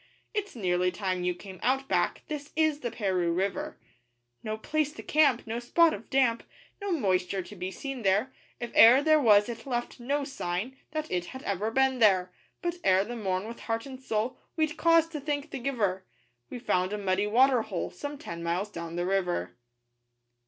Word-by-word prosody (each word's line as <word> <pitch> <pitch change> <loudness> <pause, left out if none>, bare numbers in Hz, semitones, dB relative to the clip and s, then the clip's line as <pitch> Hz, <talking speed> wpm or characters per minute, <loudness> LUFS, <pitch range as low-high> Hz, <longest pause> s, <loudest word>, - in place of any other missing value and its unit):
'It's 415 -5 -3
nearly 180 -4 +1
time 185 -1 -2
you 180 0 0
came 190 0 -11
out 270 +2 +1
back - - 0
'This 300 -2 -6
is 315 -2 +2
the 245 - -3
Paroo 190 -6 0
River!' 200 - -2 0.6
No 215 0 -4
place 300 +6 -1
to - - -9
camp 290 -6 +3
no 225 +1 -3
spot 320 +7 +4
of 210 - -8
damp 255 -4 +2 0.4
No 400 -1 -2
moisture 190 - 0
to 210 - -11
be 185 0 -4
seen 270 +5 -6
there; 205 +6 +1 0.3
If 240 -1 -6
e'er 250 +5 +8
there 310 0 +5
was 210 -6 +5
it 235 +2 -7
left 240 0 -3
no 280 +4 -1
sign 230 -2 -3
That 310 0 -4
it 180 -1 -1
had 260 +8 -9
ever 200 +2 -1
been 265 +2 +2
there. 185 -5 +4 0.3
But 345 0 -1
ere 190 0 +4
the 240 +3 -6
morn, 190 -2 -2
with 235 - -8
heart 225 0 -3
and 265 -1 -9
soul 225 0 -2 0.2
We'd 310 -2 0
cause 330 -1 +4
to 310 -2 -5
thank 290 +1 -3
the 275 - -4
Giver 215 -8 -1 0.5
We - - -6
found 185 -5 0
a - - -1
muddy 195 0 0
water 250 +3 +4
hole 190 -5 -4
Some 285 +10 -6
ten 170 -10 -7
miles 175 +5 -2
down 170 -2 -6
the 175 0 -1
river. 180 - -1
230 Hz, 195 wpm, -28 LUFS, 190-275 Hz, 0.6 s, e'er